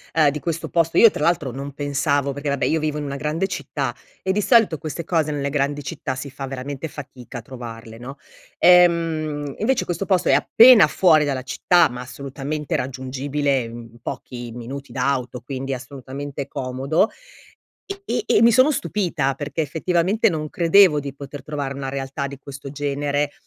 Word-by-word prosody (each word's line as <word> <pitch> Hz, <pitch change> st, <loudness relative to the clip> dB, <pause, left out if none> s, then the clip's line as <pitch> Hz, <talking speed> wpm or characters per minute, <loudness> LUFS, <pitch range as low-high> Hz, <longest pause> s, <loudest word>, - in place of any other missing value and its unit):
uhm, 155 Hz, -3 st, +5 dB
di 150 Hz, -, -5 dB
questo 160 Hz, 0 st, -3 dB
posto 165 Hz, -1 st, +1 dB
io 230 Hz, -, +8 dB
tra -, -, -6 dB
l'altro 165 Hz, -5 st, +1 dB
non 140 Hz, +3 st, -7 dB
pensavo, 140 Hz, 0 st, 0 dB
perché 145 Hz, +1 st, -4 dB
vabbè 140 Hz, -1 st, 0 dB
io 160 Hz, -, +1 dB
vivo 150 Hz, -1 st, -2 dB
in 150 Hz, -, -3 dB
una 140 Hz, -1 st, -4 dB
grande 150 Hz, +5 st, -1 dB
città 135 Hz, -9 st, -3 dB, 0.3 s
e 190 Hz, -, +1 dB
di 205 Hz, +2 st, +1 dB
solito 220 Hz, -, +4 dB
queste 155 Hz, +3 st, -5 dB
cose 160 Hz, -2 st, 0 dB
nelle 140 Hz, -1 st, -2 dB
grandi 145 Hz, 0 st, -1 dB
città 130 Hz, 0 st, -4 dB
si 140 Hz, +2 st, -7 dB
fa 135 Hz, 0 st, -6 dB
veramente 135 Hz, +3 st, -5 dB
fatica 130 Hz, -4 st, -9 dB
a -, -, -9 dB
trovarle, 115 Hz, -2 st, -9 dB
no? 135 Hz, +4 st, -9 dB, 0.4 s
Ehm, 165 Hz, -5 st, +3 dB
invece 245 Hz, +4 st, +1 dB
questo 175 Hz, +2 st, -3 dB
posto 185 Hz, -2 st, +2 dB
è -, -, +5 dB
appena 235 Hz, -2 st, +7 dB
fuori 160 Hz, -5 st, +4 dB
dalla 135 Hz, -3 st, -2 dB
città, 175 Hz, +6 st, +3 dB
ma 125 Hz, 0 st, -7 dB
assolutamente 140 Hz, +3 st, -5 dB
raggiungibile 135 Hz, +2 st, -1 dB
in 115 Hz, 0 st, -9 dB
pochi 120 Hz, 0 st, -7 dB
minuti 125 Hz, +4 st, -8 dB
d'auto. 125 Hz, -2 st, -1 dB
Quindi 135 Hz, +1 st, -4 dB
assolutamente 135 Hz, +2 st, -7 dB
comodo, 135 Hz, -, 0 dB, 1.0 s
e -, -, -1 dB
e -, -, +3 dB
mi 235 Hz, 0 st, +6 dB
sono 255 Hz, +6 st, +5 dB
stupita 170 Hz, -, -1 dB
perché 145 Hz, +3 st, -3 dB
effettivamente 175 Hz, +7 st, +1 dB
non 155 Hz, -4 st, -3 dB
credevo 170 Hz, -1 st, +5 dB
di 140 Hz, -1 st, -6 dB
poter 140 Hz, 0 st, -9 dB
trovare 140 Hz, -1 st, -4 dB
una 135 Hz, -1 st, -5 dB
realtà 135 Hz, +1 st, -3 dB
di 140 Hz, 0 st, -9 dB
questo 140 Hz, 0 st, -9 dB
genere, 145 Hz, 0 st, -1 dB
145 Hz, 175 wpm, -22 LUFS, 135-160 Hz, 1.0 s, io